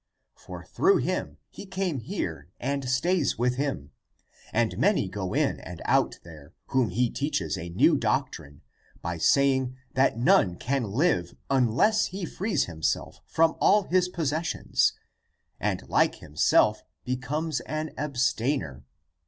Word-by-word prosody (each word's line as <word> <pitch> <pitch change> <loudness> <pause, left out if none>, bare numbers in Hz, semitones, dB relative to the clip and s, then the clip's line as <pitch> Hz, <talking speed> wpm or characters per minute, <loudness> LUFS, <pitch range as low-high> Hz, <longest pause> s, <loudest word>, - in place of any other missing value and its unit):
For - - -10
through 390 +1 +3
him - - -2
he 200 - -10
came 190 -6 -2
here 85 - -5
and 140 0 -2
stays 160 +5 +1
with 125 +1 0
him. 135 - -3 0.6
And 115 0 0
many 200 - +2
go 95 -1 -4
in - - +1
and - - -9
out - - +2
there 80 -1 -14
whom 130 -5 +2
he 120 +6 0
teaches 140 - -2
a 85 - -6
new 85 - +4
doc - - 0
trine 70 0 -11 0.4
by 85 -1 -3
saying 130 - +2 0.2
that 130 -3 +2
none 100 -6 +4
can 130 +5 -1
live 105 - 0 0.2
unless 135 - +3
he 190 0 -5
frees 200 +5 -1
himself 80 -3 -3
from 165 0 +2
all 210 0 +5
his 180 -1 +1
possessions 160 -1 0 0.7
and - - -2
like - - +2
himself 75 0 +2 0.2
becomes 135 +4 -2
an 155 +4 -4
abstainer. 130 - -1
130 Hz, 135 wpm, -27 LUFS, 95-160 Hz, 0.7 s, all